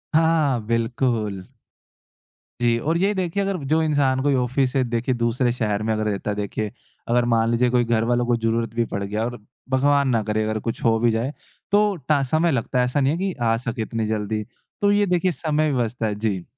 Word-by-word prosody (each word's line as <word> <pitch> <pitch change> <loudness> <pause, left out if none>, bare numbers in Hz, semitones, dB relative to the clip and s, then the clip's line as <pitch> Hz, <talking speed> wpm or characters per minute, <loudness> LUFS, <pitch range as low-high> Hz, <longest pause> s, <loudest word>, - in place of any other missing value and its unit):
हाँ, 165 - +5
हाँ, 160 -3 +3
हाँ, 115 -4 -2
बिल्कुल। 115 -4 -1 1.1
जी 120 -1 +2
और 160 +6 0
यही 195 +4 +2
देखिए 190 +1 -1
अगर 195 -1 -1
जो 160 +2 +2
इंसान 140 -4 +2
कोई 145 -2 +2
ऑफ़िस 130 +1 +1
से 135 - +2
देखिए 120 +1 -1
दूसरे 120 +1 +1
शहर 105 -4 -1
में 110 0 0
अगर 110 0 -1
रहता 105 -1 -2
है - - -3
देखिए, 105 +1 -3 0.4
अगर 120 +1 +2
मान 115 -1 +2
लीजिए 120 +1 +2
कोई 125 0 +3
घरवालों 120 +1 +1
को 120 0 +2
ज़रूरत 115 0 -1
भी 115 0 +1
पड़ 100 0 -2
गया 105 +3 -2
और 120 0 -4 0.3
भगवान 140 +1 +3
ना 115 -3 +2
करे 110 0 -1
अगर 110 0 -1
कुछ 115 - -4
हो 115 -1 +4
भी 120 0 +3
जाए, 115 +6 -1 0.4
तो 205 -1 +3
टा 145 -1 0
समय 160 +5 +1
लगता 125 0 -1
है, 125 - +3
ऐसा 125 +3 0
नहीं 135 - +3
है - - -2
कि 190 0 -1
आ 115 -1 +3
सके 115 -1 -4
इतनी 110 0 -2
जल्दी 105 0 -2 0.4
तो 205 - +4
ये 205 0 +3
देखिए 180 0 +1
समय 155 -1 0
व्यवस्था 120 -3 -1
जी। 100 -4 -2
120 Hz, 215 wpm, -23 LUFS, 115-145 Hz, 1.1 s, हाँ